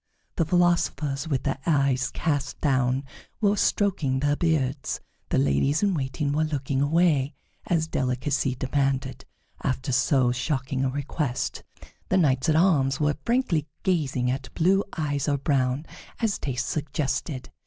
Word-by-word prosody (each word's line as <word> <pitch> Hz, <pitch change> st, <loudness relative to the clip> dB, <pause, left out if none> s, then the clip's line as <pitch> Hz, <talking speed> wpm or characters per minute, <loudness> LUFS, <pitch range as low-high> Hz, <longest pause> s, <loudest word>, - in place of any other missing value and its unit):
The 165 Hz, -, +2 dB
philosophers, 160 Hz, -4 st, +1 dB
with 135 Hz, -5 st, -1 dB
their 135 Hz, -1 st, -1 dB
eyes 140 Hz, -5 st, +2 dB
cast 145 Hz, -3 st, -2 dB
down, 130 Hz, -2 st, +1 dB, 0.4 s
were 205 Hz, -2 st, +3 dB
stroking 175 Hz, -11 st, +1 dB
their 145 Hz, +1 st, +2 dB
beards; 145 Hz, -5 st, 0 dB, 0.3 s
the -, -, +1 dB
ladies 70 Hz, -, +2 dB
in 200 Hz, -2 st, +3 dB
waiting 140 Hz, -1 st, -1 dB
were 155 Hz, +2 st, +1 dB
looking 140 Hz, -3 st, -1 dB
away, 150 Hz, -2 st, +2 dB, 0.3 s
as 160 Hz, -2 st, +1 dB
delicacy 130 Hz, 0 st, 0 dB
demanded, 135 Hz, 0 st, -1 dB, 0.4 s
after 130 Hz, +1 st, -1 dB
so 130 Hz, 0 st, +3 dB
shocking 130 Hz, +1 st, -1 dB
a 135 Hz, -, +1 dB
request; 140 Hz, -1 st, -2 dB, 0.5 s
the 190 Hz, -, +3 dB
knights 140 Hz, -3 st, +2 dB
at 155 Hz, -, +3 dB
arms 150 Hz, -6 st, +3 dB
were 150 Hz, -1 st, +1 dB
frankly 230 Hz, -, +1 dB, 0.2 s
gazing 135 Hz, -9 st, +1 dB
at 135 Hz, +1 st, -5 dB
blue 190 Hz, +4 st, +3 dB
eyes 145 Hz, -3 st, -1 dB
or 145 Hz, -, +2 dB
brown, 135 Hz, 0 st, 0 dB, 0.3 s
as 225 Hz, -3 st, 0 dB
taste 130 Hz, -2 st, -2 dB
suggested. 145 Hz, -2 st, -2 dB
140 Hz, 140 wpm, -26 LUFS, 130-160 Hz, 0.5 s, were